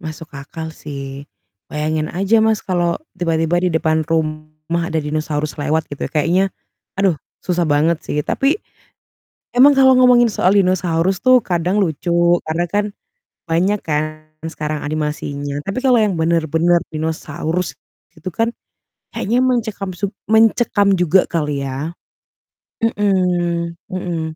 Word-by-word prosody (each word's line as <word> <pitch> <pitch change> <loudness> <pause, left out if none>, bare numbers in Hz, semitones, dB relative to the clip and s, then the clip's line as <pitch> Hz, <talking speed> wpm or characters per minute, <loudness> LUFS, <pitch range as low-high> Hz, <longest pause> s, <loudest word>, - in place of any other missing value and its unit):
Masuk 160 +1 -8
akal 160 +3 -7
sih. 140 -2 -8 0.4
Bayangin 155 +1 -2
aja, 195 +6 +2
Mas, 220 -1 +2
kalau 175 -2 0 0.2
tiba-tiba 165 0 +1
di 180 - +1
depan 160 -1 +1
rumah 155 +1 -2
ada 165 - -5
dinosaurus 155 0 -2
lewat 155 +2 0
gitu 145 - -4
kayaknya 175 +5 +2 0.5
aduh 195 -4 +3 0.3
susah 175 -1 +1
banget 155 +3 +2
sih, 150 - -3
tapi 285 +8 +1 1.0
emang 280 +3 +8
kalau 265 -1 +7
ngomongin 245 -2 +6
soal 185 - +2
dinosaurus 185 -1 +2
tuh 255 0 +7
kadang 180 +2 0
lucu 170 0 -2 0.4
karena 165 +2 0
kan 205 0 +1 0.7
banyak 190 +5 +2
kan 150 -1 +1 0.4
sekarang 155 -2 -3
animasinya, 145 -2 -3
tapi 195 +6 -2
kalau 255 -2 +5
yang 210 -2 +2
benar-benar 165 +1 +2 0.2
dinosaurus 160 +1 -3 0.4
gitu 170 +2 -7
kan 230 +5 -1 0.6
kayaknya 235 +5 0
mengcekam 220 -6 -1
sub 195 +2 -3 0.2
mencekam 220 -2 +4
juga 180 +2 +4
kali 150 -4 -1
ya. 140 +5 -4 0.9
Mhm 180 -5 +1
mhm. 180 -3 -3
170 Hz, 125 wpm, -19 LUFS, 155-195 Hz, 1.0 s, emang